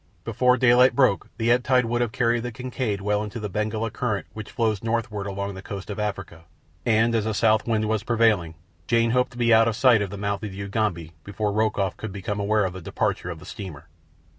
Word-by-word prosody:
Before 125 +3 +2
daylight 125 +1 +5
broke 130 -8 +2
the 115 +1 +1
ebb 125 +1 +3
tide 125 -1 +3
would 120 +1 -1
have 120 -2 0
carried 120 +1 +1
the 120 +1 -4
Kincaid 120 -3 -3
well 105 +1 0
into 110 +2 -6
the 105 -2 -5
Benguela 110 +2 -2
current 110 -4 -2
which 110 -1 -8
flows 110 -5 0
northward 115 -3 -2
along 100 0 -4
the 95 - -8
coast 100 0 -7
of 105 - -5
Africa, 100 -5 -5 0.4
and, 115 0 +3
as 110 -1 0
a 110 - -1
south 110 0 +2
wind 110 -2 +1
was 110 -1 0
prevailing, 110 -8 +1 0.3
Jane 115 0 +2
hoped 125 +1 +2
to - - -12
be 120 -1 +3
out 115 0 +6
of 115 - 0
sight 120 -3 +5
of 100 - -2
the 100 - -7
mouth 100 0 -2
of 105 - -4
the 95 - -10
Ugambi 100 -6 -2
before 105 +1 -2
Rokoff 105 -3 0
could 110 - -6
become 100 +1 -4
aware 105 0 +2
of 90 - -3
the 95 - -8
departure - - -2
of - - -5
the - - -13
steamer. 90 -8 -9
110 Hz, 230 wpm, -24 LUFS, 100-115 Hz, 0.4 s, out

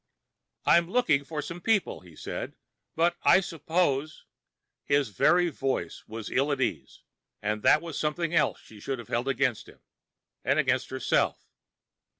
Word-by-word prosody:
"I'm 170 0 +4
looking 190 - +2
for 150 +1 -5
some 170 +4 -7
people," 220 -2 +1
he 90 -3 -16
said. - - -6 0.4
"But 170 +2 +2
I - - +6
suppose 160 -4 -1 0.3
" - - -59
His 140 -3 +1
very 175 - +3
voice 135 -3 -3
was 110 -1 -7
ill 140 +3 +1
at 140 - -1
ease, 75 - -3 0.4
and 105 +1 -2
that 155 - +4
was 165 -4 -5
something 155 +2 -1
else 165 - +2
she 110 - -14
should 135 +5 -3
have 120 -3 -10
held 120 +3 -1
against 135 -3 0
him. - - -18 0.6
And - - +2
against - - +1
herself. - - 0
145 Hz, 155 wpm, -28 LUFS, 125-170 Hz, 0.6 s, I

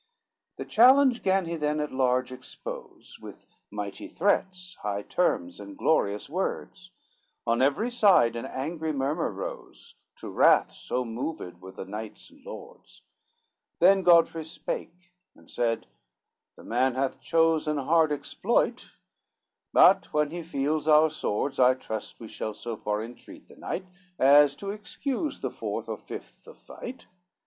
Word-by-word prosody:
XVIII 470 0 -48
The - - -22
challenge 255 +2 +6
gan 190 -1 +2
he 170 0 -3
then 150 -1 -1
at 150 0 -2
large 130 -1 +1
expose, 130 0 -9
With - - -11 0.2
mighty 105 -1 -6
threats, 185 -1 -1
high 100 0 -3
terms 265 - -1
and 295 -1 -10
glorious 105 - +1
words; 185 +2 -4 0.6
On 115 +1 +1
every 145 - +2
side 195 - +4
an 115 +3 -4
angry 155 +4 -3
murmur 145 +4 -1
rose, - - -8 0.2
To - - -10
wrath - - +4
so 125 0 -3
moved 115 - -5
were 95 +1 -10
the 95 - -8
knights 105 +2 -8
and - - -21
lords. - - -12 0.7
Then 190 +2 +5
Godfrey 170 -2 +4
spake, 175 +2 -7 0.2
and - - -19
said, 115 -1 -1 0.7
"The - - -15
man 125 +2 +1
hath 135 0 -2
chose 165 -1 +2
An 150 0 0
hard 160 +2 +3
exploit, 145 - -1 0.7
but - - +5
when 150 -1 +1
he 175 +1 -5
feels 155 -1 -2
our 155 0 +6
swords, 135 -2 -2
I 130 0 +6
trust 110 -4 -6
we 115 - -9
shall 110 0 -5
so 115 +1 -5
far 105 0 -2
entreat 120 +2 -12
the - - -16
knight, 185 - -5 0.3
As 140 +1 +6
to 200 0 -5
excuse 255 +8 -4
the - - -3
fourth - - -5
or - - -4
fifth - - -10
of - - -13
fight. 255 +2 -10
150 Hz, 150 wpm, -27 LUFS, 125-185 Hz, 0.7 s, challenge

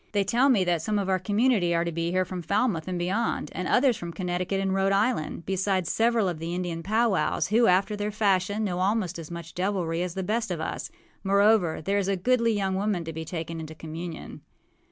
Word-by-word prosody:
They 205 -1 +2
tell 240 +8 +3
me 215 -8 +4
that 175 -3 +1
some 210 +5 -1
of 195 -2 -1
our 190 -1 +2
community 205 -2 +2
are 170 0 +1
to 170 - -2
be 165 +1 -2
here 185 +1 +1
from 180 -1 -5
Falmouth 200 -3 0
and 180 -1 -2
beyond, 185 -2 -1
and 180 +1 -3
others 255 -2 +3
from 170 -1 -6
Connecticut 180 +2 -2
and 195 -1 0
Rhode 195 0 +2
Island, 195 -5 0
besides 190 -2 0
several 230 -2 +2
of 175 -3 -3
the 165 +2 -4
Indian 175 -2 -3
powwows, 215 0 +1
who, 230 +3 +4
after 195 +4 +3
their 205 0 -2
fashion, 205 0 +1
know 180 -4 -2
almost 190 -2 0
as 160 - -8
much 170 -1 -8
deviltry 180 -3 -1
as 180 -1 -3
the 190 - -2
best 220 +3 -1
of 175 -3 -3
us. 160 - -4 0.3
Moreover, 200 -4 +3
there 200 +3 +1
is 195 - -1
a 195 - +1
goodly 230 +3 +2
young 195 -2 0
woman 195 -2 -1
to 165 0 -6
be 160 0 -5
taken 165 0 -5
into 160 0 -8
communion. 160 +1 -7
190 Hz, 220 wpm, -26 LUFS, 170-210 Hz, 0.3 s, me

